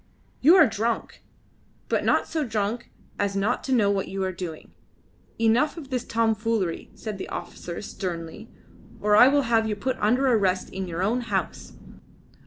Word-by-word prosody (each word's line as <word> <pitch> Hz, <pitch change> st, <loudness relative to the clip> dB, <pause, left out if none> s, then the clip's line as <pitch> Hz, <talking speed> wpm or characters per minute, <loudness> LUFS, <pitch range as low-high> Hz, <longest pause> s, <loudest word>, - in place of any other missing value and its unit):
"You 320 Hz, +7 st, +7 dB
are 375 Hz, -, +8 dB
drunk, 220 Hz, +1 st, -2 dB, 0.7 s
but -, -, 0 dB
not -, -, +2 dB
so 315 Hz, -2 st, -1 dB
drunk 220 Hz, -1 st, -2 dB, 0.3 s
as 200 Hz, -1 st, 0 dB
not 205 Hz, +5 st, 0 dB
to 270 Hz, -, -3 dB
know 215 Hz, -6 st, +3 dB
what 195 Hz, -1 st, -1 dB
you 195 Hz, 0 st, -3 dB
are 190 Hz, -, -1 dB
doing. 170 Hz, -3 st, -7 dB, 0.7 s
Enough 230 Hz, +8 st, +2 dB
of 290 Hz, -5 st, -8 dB
this 250 Hz, -2 st, -1 dB
tomfoolery," 225 Hz, -5 st, -1 dB
said 215 Hz, -3 st, -6 dB
the -, -, -6 dB
officer 175 Hz, +3 st, -6 dB
sternly, 175 Hz, +2 st, -6 dB, 0.5 s
"or 210 Hz, 0 st, +3 dB
I 245 Hz, -, +8 dB
will 285 Hz, +1 st, +3 dB
have 225 Hz, -2 st, +2 dB
you 210 Hz, -, -1 dB
put 255 Hz, +5 st, -2 dB
under 245 Hz, +6 st, +2 dB
arrest 195 Hz, -7 st, +1 dB
in 190 Hz, -1 st, -4 dB
your 170 Hz, +1 st, -3 dB
own 235 Hz, +6 st, +1 dB
house." 210 Hz, -5 st, -3 dB
220 Hz, 170 wpm, -25 LUFS, 195-240 Hz, 0.7 s, are